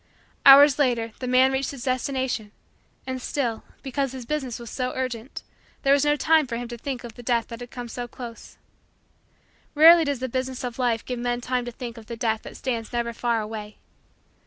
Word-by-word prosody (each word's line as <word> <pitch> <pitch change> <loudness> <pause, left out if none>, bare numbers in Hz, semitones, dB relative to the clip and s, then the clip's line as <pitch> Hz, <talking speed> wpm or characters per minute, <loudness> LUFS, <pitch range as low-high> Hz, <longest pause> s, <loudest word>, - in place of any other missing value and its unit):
Hours 280 +1 +9
later, 240 -5 +1
the 255 - -4
man 255 +1 +5
reached 265 0 -1
his 270 -4 -7
destination, 255 -4 -1 0.5
and 260 -1 -4
still, 245 -5 -2 0.2
because 270 -1 -2
his 255 -2 -7
business 265 -4 -3
was 235 -2 -9
so 255 -1 -2
urgent, 255 -1 -4 0.4
there 275 -1 +5
was 285 0 +3
no 295 0 +3
time 315 0 +3
for 235 -1 -3
him 240 0 -5
to 240 - -6
think 265 -1 -4
of 235 -2 -8
the 245 - -11
Death 235 -1 0
that 230 -1 -7
had 245 0 -8
come 245 -1 -7
so 245 +1 -5
close. 240 -2 -10 1.2
Rarely 330 +3 +8
does 285 -2 -1
the 260 +1 -3
business 260 +1 -3
of 245 0 -5
life 235 -3 0
give 250 -1 -4
men 240 0 -1
time 250 0 -2
to 245 - -5
think 235 -1 -7
of 220 - -15
the 235 - -6
Death 220 -1 0
that - - -10
stands 235 -4 -3
never 235 -1 -2
far 235 -1 0
away. 215 -1 -7
250 Hz, 205 wpm, -25 LUFS, 235-265 Hz, 1.2 s, Hours